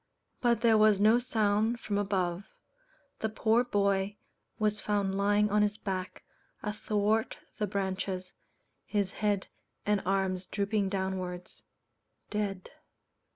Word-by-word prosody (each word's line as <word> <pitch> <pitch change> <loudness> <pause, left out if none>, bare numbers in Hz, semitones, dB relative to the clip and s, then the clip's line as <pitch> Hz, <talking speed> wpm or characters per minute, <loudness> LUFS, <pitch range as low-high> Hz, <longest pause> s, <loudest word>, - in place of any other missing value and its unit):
But 235 -2 +3
there 225 -2 +5
was 215 -2 +5
no 215 +4 +5
sound 220 -1 +1
from 205 -3 -1
above. 190 -2 -1 0.7
The 220 - -1
poor 225 +2 +2
boy 200 -3 +1 0.4
was 210 0 0
found 200 -2 0
lying 205 +1 +2
on 210 0 +4
his 210 0 +1
back 185 -3 -4 0.4
athwart 210 +1 0 0.2
the 210 - +1
branches, 190 -1 -3 0.5
his 200 -3 0
head 205 -2 0 0.4
and 210 -1 +2
arms 190 -1 0
drooping 200 0 0
downwards 190 -2 -4 0.7
dead. 200 -3 -3
205 Hz, 115 wpm, -30 LUFS, 190-215 Hz, 0.7 s, there